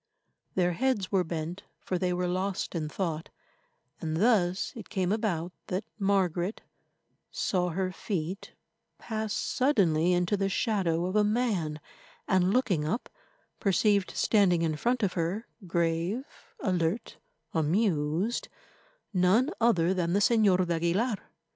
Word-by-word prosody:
Their 180 -1 +2
heads 240 -3 0
were 190 -2 +3
bent, 165 +2 -4 0.2
for 185 - -2
they 180 0 0
were 180 0 0
lost 185 +2 -2
in 155 -3 -2
thought, 165 -3 -3 0.7
and 160 -2 -2
thus 190 -3 +2
it 225 -4 -9
came 190 -4 0
about 185 -6 -1
that 185 +3 -2 0.2
Margaret 190 -1 +1 0.7
saw 180 -2 0
her 185 +2 -1
feet 185 -1 -4 0.4
pass 220 -2 -4
suddenly 180 - +2
into 175 +3 +2
the 195 -1 0
shadow 185 -5 0
of 185 +2 -3
a 210 - +5
man, 205 -9 0 0.5
and, 185 -1 +3
looking 200 -10 +2
up, 180 +11 -2 0.5
perceived 200 0 +2
standing 185 -6 +3
in 160 -2 0
front 240 +8 0
of 190 - +1
her, 180 +6 -2 0.2
grave, 170 +7 0 0.4
alert, 180 +2 -1 0.4
amused, 165 +3 +1 0.7
none 195 - +3
other 185 -7 +3
than 175 -2 0
the 200 - +3
Señor 205 -4 +4
d'Aguilar. 175 +7 +1
185 Hz, 130 wpm, -29 LUFS, 170-210 Hz, 0.7 s, a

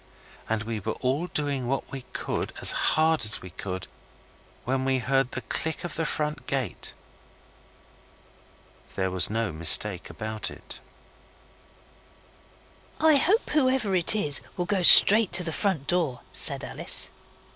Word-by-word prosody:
And 110 -1 -2
we 110 0 -5
were 110 +2 -5
all 135 +7 -3
doing 140 -6 -3
what 135 +2 -4
we 135 - -7
could - - -5
as - - +5
hard 160 -3 +1
as 110 0 +2
we 90 - -11
could, 95 -1 -7 0.8
when 130 +1 -2
we 135 0 0
heard 135 +1 -1
the 130 - -5
click 160 +4 -3
of 175 - -6
the 165 -1 -3
front 150 -1 -4
gate. 135 -4 -5 2.0
There 95 -1 -2
was 90 0 +5
no 115 -1 -3
mistake 85 +4 +5
about 110 0 -6
it. - - -8 2.2
'I 315 -2 +4
hope 395 - 0
whoever 260 -8 0
it 180 +4 +2
is 150 -9 -1 0.2
will 175 - -2
go 190 +1 -2
straight 210 +4 +9
to 180 - +1
the 165 - -5
front 185 -7 -2
door,' 160 -8 -1
said - - -1
Alice. - - -4
135 Hz, 145 wpm, -25 LUFS, 110-175 Hz, 2.2 s, straight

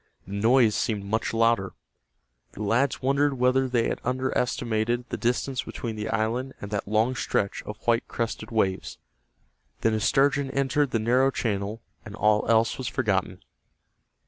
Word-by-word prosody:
The 100 - -9
noise 115 +2 +4
seemed 105 -2 -1
much 110 +2 -1
louder. 115 -4 +2 0.8
The 105 - -6
lads 125 +6 +1
wondered 140 +1 +2
whether 130 +1 +2
they 120 -2 +1
had - - -3
underestimated 120 -2 -1
the - - -3
distance 125 +2 -1
between 115 -4 -6
the 105 0 -4
island 120 +5 -1
and 100 - -8
that 105 -2 -2
long 110 +4 +2
stretch 100 -4 -1
of 105 - -6
white 120 0 +2
crested 115 -1 -4
waves. 100 -5 -1 0.8
Then 115 - +2
a 110 - +1
sturgeon 140 +4 +2
entered 140 +1 +1
the 120 - 0
narrow 125 +4 +3
channel, 105 -3 -3 0.2
and 110 -2 -9
all 105 +1 +2
else 115 +1 +3
was 130 - -3
forgotten. 95 -6 -1
115 Hz, 155 wpm, -26 LUFS, 105-130 Hz, 0.8 s, noise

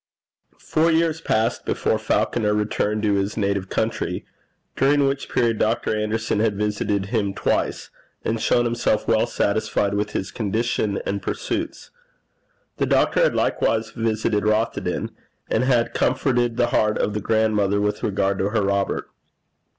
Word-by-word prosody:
Four 160 +2 +1
years 165 0 +1
passed 115 -4 0
before - - 0
Falconer 105 -3 +1
returned 105 0 -1
to 105 -1 +2
his 100 +2 -1
native 100 -2 -1
country, - - -2 0.5
during 140 +1 +3
which 135 0 -2
period 115 -3 +1
Dr. 110 0 +1
Anderson 105 0 -1
had 105 -2 +1
visited 105 -1 -1
him 100 -4 0
twice, - - -1 0.3
and 115 0 -1
shown 120 - +2
himself 120 -2 0
well 110 -1 +3
satisfied 100 -1 0
with 105 +1 -2
his 95 - -3
condition 110 -1 -1
and 100 0 -2
pursuits. - - -4 0.9
The - - 0
doctor - - +3
had - - +3
likewise 110 0 0
visited 110 -2 0
Rothieden, 110 +2 0 0.4
and 115 +3 +2
had 120 -3 +2
comforted 120 -3 +1
the 120 -1 +2
heart 105 0 +2
of 105 - 0
the 105 - -2
grandmother 105 -2 +1
with 105 0 -1
regard 100 -1 0
to 95 - +1
her 105 -1 0
Robert. 100 0 0
110 Hz, 145 wpm, -22 LUFS, 105-120 Hz, 0.9 s, during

